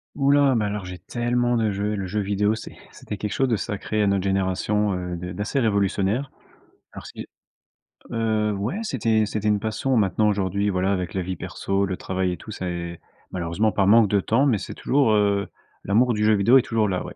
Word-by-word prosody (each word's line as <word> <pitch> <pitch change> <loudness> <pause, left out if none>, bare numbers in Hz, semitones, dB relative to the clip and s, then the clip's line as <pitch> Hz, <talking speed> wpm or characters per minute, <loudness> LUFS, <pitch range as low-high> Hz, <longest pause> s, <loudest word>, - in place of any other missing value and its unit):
Ouh 140 -1 +1
là, 140 -3 +4
mais 105 -2 +1
alors 105 -1 -3
j'ai 90 0 -7
tellement 120 0 0
de 110 -2 +1
jeux. 105 +2 -2
Le 95 -2 -3
jeu 105 +4 -2
vidéo, 105 +1 +1
c'est 110 - -9 0.2
c'était - - -7
quelque 105 - -4
chose 135 - +1
de 115 - +1
sacré 105 +1 -2
à - - +2
notre 100 -1 +1
génération, 95 +2 0
heu, 90 -1 -4
d'a 90 +1 -6
d'assez 105 +8 -2
révolutionnaire. 100 +3 0 0.6
Alors - - -10
c'est - - -9 0.8
heu, 110 -2 0
ouais, 105 - -3
c'était 110 - +1
c'était 105 0 -3
une 105 -1 +2
passion. 110 +4 -1
Maintenant, 105 0 +2
aujourd'hui, 100 0 0
voilà, 95 +1 0
avec 90 -2 -3
la 95 - -1
vie 90 +1 -4
perso, 95 +4 -2
le 95 -1 -3
travail 95 -1 -2
et - - -6
tout, 110 - -10
ça 95 -3 -4
est, 85 -1 -5 0.3
malheureusement, 90 +5 0
par 100 -2 +1
manque 110 +1 +6
de 100 0 +2
temps, 115 +8 +2
mais 120 -8 +2
c'est - - -7
toujours, 135 -5 +2
heu, 100 -2 +2 0.4
l'amour 120 +5 +3
du 105 -1 -1
jeu 110 0 +4
vidéo 115 +7 +5
est - - +2
toujours 115 -2 0
là, 95 -2 -2
ouais. - - -9
105 Hz, 215 wpm, -23 LUFS, 95-110 Hz, 0.8 s, manque